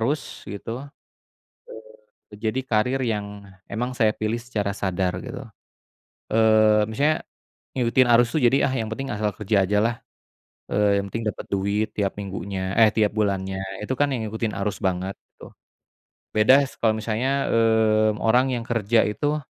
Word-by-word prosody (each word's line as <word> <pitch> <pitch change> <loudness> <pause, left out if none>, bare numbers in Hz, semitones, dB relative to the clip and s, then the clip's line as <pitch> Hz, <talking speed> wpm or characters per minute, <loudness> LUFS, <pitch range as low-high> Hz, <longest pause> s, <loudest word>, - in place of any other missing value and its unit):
arus 135 +5 -2
gitu, 115 +7 -6 1.5
eee, - - -12
jadi 110 +4 0
karir 125 +3 +1
yang 105 -3 -4 0.2
emang 125 +4 -3
saya 110 -2 +4
pilih 110 +2 -2
secara 105 -5 -3
sadar 95 -2 -1
gitu, - - -7 0.9
eee, 110 -1 +4
misalnya, 150 +8 +1 0.6
ngikutin 125 +1 +3
arus 120 +1 +6
itu - - +3
jadi 135 +2 +3 0.2
yang 110 - -5
penting 135 +2 -4
asal 105 0 0
kerja 105 -2 +1
aja 105 +2 +1
lah, 115 +2 +1 0.8
eee, 100 0 +3
yang - - -6
penting 115 -1 -2
dapet - - -7
duit 100 +2 0
tiap 100 -2 -1
minggunya 95 -1 -4
eh, 110 -1 +7
tiap 105 -2 +2
bulannya 95 -3 -1 0.2
itu 120 - -2
kan 145 - +4
yang 115 - -3
ngikutin 110 0 -3
arus 105 - -3
banget 95 0 -1 0.2
gitu, - - -13 0.9
beda 130 +6 +5
kalau 110 -1 +4
misalnya, 125 +6 -1
mmm, 110 -1 +3
orang 125 +4 +3
yang 120 -1 -3
kerja 115 -1 +2
itu 145 +9 -1
110 Hz, 150 wpm, -24 LUFS, 100-120 Hz, 1.5 s, eh